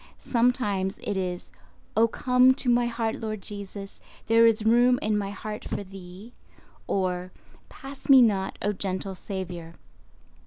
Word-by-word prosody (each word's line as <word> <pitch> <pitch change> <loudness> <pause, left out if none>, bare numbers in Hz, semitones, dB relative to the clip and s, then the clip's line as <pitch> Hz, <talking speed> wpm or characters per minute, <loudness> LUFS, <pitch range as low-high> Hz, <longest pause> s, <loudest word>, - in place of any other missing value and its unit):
Sometimes 225 -5 0
it 205 - -2
is, 180 -2 -4 0.4
"Oh, 225 +2 +5
come 250 +2 +3
to 260 - -3
my 240 0 +3
heart 230 -1 -2
Lord 215 -2 -4
Jesus; 200 -1 -6 0.3
there 230 +1 +5
is 220 -1 +1
room 245 +2 +5
in 215 0 0
my 200 -1 -1
heart 210 +1 -6
for - - -4
Thee"—or 185 -1 -6 0.4
"Pass 275 +1 -11
me 270 -1 +9
not, 195 -4 0
O 205 - +1
gentle 190 0 -3
Saviour." 180 -3 -7
210 Hz, 140 wpm, -26 LUFS, 190-230 Hz, 0.4 s, me